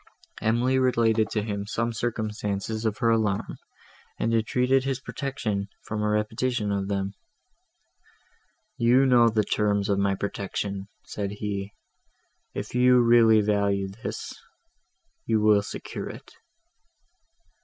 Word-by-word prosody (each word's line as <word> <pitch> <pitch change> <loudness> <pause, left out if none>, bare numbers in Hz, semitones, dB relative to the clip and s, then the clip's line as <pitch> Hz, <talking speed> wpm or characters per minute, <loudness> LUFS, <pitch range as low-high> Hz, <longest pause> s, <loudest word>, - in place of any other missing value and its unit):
Emily 120 +4 +2
related 115 -4 +2
to 105 - -1
him 100 -2 -4
some 115 +2 -1
circumstances 110 -1 -3
of 110 -1 0
her 115 -3 +2
alarm, 105 -3 0 0.6
and 115 - 0
entreated 125 +4 +2
his 135 -1 -2
protection 115 -8 -3 0.2
from 105 0 -4
a 105 - +1
repetition 105 +1 -1
of 100 -1 -1
them. 100 -1 -2 1.6
"You 125 +3 +4
know 120 -3 +5
the 110 -1 +1
terms 105 -1 0
of 100 -1 +2
my 100 0 +1
protection," 100 0 -4 0.2
said 100 -1 -4
he; 100 -1 -4 0.8
"if - - -5
you 125 0 +5
really 115 -2 +6
value 100 -2 +1
this, 100 +4 -6 0.9
you 110 -1 +2
will 105 -1 +4
secure 100 - -6
it." - - -11
110 Hz, 125 wpm, -26 LUFS, 100-120 Hz, 1.6 s, really